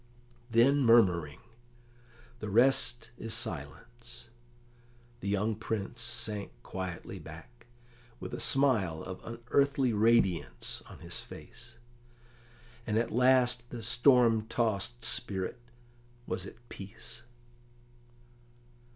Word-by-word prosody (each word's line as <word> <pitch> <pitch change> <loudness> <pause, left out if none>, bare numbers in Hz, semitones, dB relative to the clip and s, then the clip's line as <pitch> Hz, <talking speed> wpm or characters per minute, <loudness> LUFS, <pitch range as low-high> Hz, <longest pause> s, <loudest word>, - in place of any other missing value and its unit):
Then 120 +5 +4
murmuring, 90 - +4 1.0
"The 110 - -5
rest 120 +2 +3
is 115 0 -2
silence," 120 0 -6 0.9
the 100 - -6
young 105 +2 +1
Prince 110 -1 -4
sank 110 -3 -2
quietly 95 -2 -6
back, 115 +10 -13 0.5
with - - -7
a - - -4
smile 110 - +1
of 95 0 -8
unearthly 125 +2 +1
radiance 105 - +1
on - - -12
his - - -5
face, 120 0 -12 1.1
and 110 0 +1
at 115 0 0
last 125 -1 +3
the 120 -2 -7
storm 120 -2 +4
tossed 115 0 -1
spirit 105 -2 -1 0.7
was 95 - -4
at 120 +3 -14
peace. 115 +4 -10
115 Hz, 100 wpm, -31 LUFS, 100-120 Hz, 1.1 s, Then